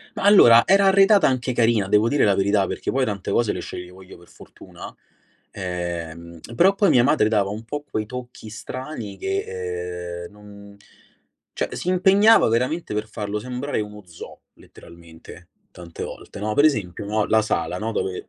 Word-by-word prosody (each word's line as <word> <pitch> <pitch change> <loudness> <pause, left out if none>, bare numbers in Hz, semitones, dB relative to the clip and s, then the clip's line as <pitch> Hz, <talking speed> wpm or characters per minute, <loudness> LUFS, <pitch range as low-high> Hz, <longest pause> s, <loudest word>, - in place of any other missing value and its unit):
Ma - - -5
allora, 120 - +7
era 195 +1 +4
arredata 195 +1 +5
anche 130 -1 -1
carina, 115 -4 +1
devo 105 +3 +3
dire 145 +3 +2
la 100 - +3
verità, 100 0 +1
perché - - -4
poi 135 0 0
tante 100 -5 -4
cose 115 -3 +1
le - - -5
sceglievo 90 +1 -9
io 95 - -14
per 85 - -19
fortuna. - - -13 0.6
Ehm, 85 -2 -6 0.2
però 190 +8 +4
poi 200 -2 +2
mia 120 -5 +4
madre 125 -5 +2
dava 105 -3 0
un 110 +2 -7
po' 145 +6 -6
quei 110 0 -3
tocchi 125 -1 -9
strani 120 -2 -7
che, 90 - -5
ehm, - - -15
non 100 -1 -15 0.8
cioè - - -4
si - - -5
impegnava 195 - +4
veramente 125 +4 -1
per 105 +1 -3
farlo 105 -1 -5
sembrare 125 +4 -4
uno 105 0 -8
zoo, 85 -1 -12
letteralmente, 85 +1 -16 0.2
tante 85 -2 -10
volte, - - -10
no, 105 +1 -2
per 145 - +3
esempio, 105 - 0
no, 105 +1 -1
la 110 0 +3
sala, 90 -4 -2
no, 110 +3 -4
dove 95 -4 -4
105 Hz, 175 wpm, -22 LUFS, 95-130 Hz, 0.8 s, allora